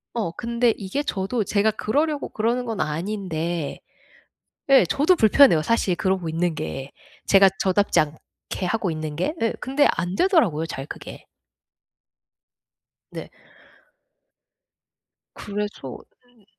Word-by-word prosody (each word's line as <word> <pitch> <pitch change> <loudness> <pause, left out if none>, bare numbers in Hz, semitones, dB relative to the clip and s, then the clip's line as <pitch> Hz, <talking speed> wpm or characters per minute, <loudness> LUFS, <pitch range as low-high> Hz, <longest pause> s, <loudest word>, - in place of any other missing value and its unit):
어. 210 -8 -1
근데 235 +4 0
이게 200 +8 -3
저도 210 -2 -2
제가 210 +2 +1
그러려고 290 +8 -1
그러는 235 +3 -1
건 225 -3 -4
아닌데 170 -1 -3 0.9
예 270 -8 +7
저도 295 - +2
불편해요 220 - +5
사실 190 -3 +1
그러고 190 -3 -1
있는 165 +1 -1
게. 135 - -5 0.4
제가 195 0 +6
저답지 195 +2 +2
않게 155 +4 -6
하고 195 -1 -1
있는 155 -1 -5
게. 295 - -1
예 225 - 0
근데 275 +3 +2
안되더라고요 185 - +1
잘 135 -4 -6
그게. - - -10 1.9
네. - - -8 2.0
그래서 205 -10 -5 0.3
음음. 245 -5 -28
200 Hz, 235 characters per minute, -23 LUFS, 165-235 Hz, 2.0 s, 예